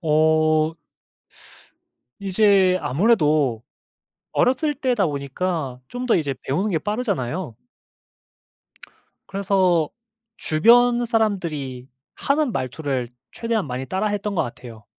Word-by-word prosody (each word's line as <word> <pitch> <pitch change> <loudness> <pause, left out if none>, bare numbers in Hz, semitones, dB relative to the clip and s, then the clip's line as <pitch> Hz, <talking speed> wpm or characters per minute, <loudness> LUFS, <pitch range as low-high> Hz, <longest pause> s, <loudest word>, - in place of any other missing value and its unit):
어. 155 0 +2 1.5
이제 195 -2 +3
아무래도 150 - +2 0.7
어렸을 265 +4 +1
때다 250 -7 +1
보니까 140 -1 -3
좀 250 +1 -5
더 245 - +3
이제 145 -4 0
배우는 185 +11 -1
게 170 -5 0
빠르잖아요. 185 - -3 1.7
그래서 190 -5 +1 0.5
주변 240 +9 +4
사람들이 165 - -2 0.3
하는 285 -3 0
말투를 130 -1 -3 0.2
최대한 230 -5 -2
많이 130 0 -4
따라했던 205 +2 -2
것 - - +1
같아요. 115 -2 -9
175 Hz, 220 characters per minute, -22 LUFS, 145-215 Hz, 1.7 s, 주변